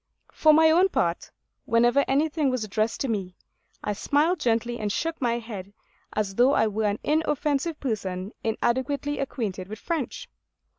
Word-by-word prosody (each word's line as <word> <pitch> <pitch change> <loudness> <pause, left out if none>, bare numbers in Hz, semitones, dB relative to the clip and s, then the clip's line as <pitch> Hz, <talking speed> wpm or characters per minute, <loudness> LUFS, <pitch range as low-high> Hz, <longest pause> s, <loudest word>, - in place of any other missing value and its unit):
For 310 - +5
my 320 +1 +6
own 360 +4 +5
part, 170 - -1 0.4
whenever 240 +4 +4
anything 295 +1 +1
was 255 -3 -1
addressed 215 +2 -1
to 270 - 0
me, 195 -6 -3 0.5
I 210 - -1
smiled 305 - +1
gently 240 -1 0
and 210 -1 -1
shook 330 +7 -2
my 235 -2 +1
head 205 -4 -8 0.4
as 205 -2 -1
though 245 +6 +4
I - - +4
were 215 0 -1
an 205 0 0
inoffensive 300 0 0
person 195 -6 -3
inadequately 260 +6 -1
acquainted 205 -9 -3
with 215 +2 -7
French. 315 +1 -4
240 Hz, 155 wpm, -26 LUFS, 215-290 Hz, 0.5 s, my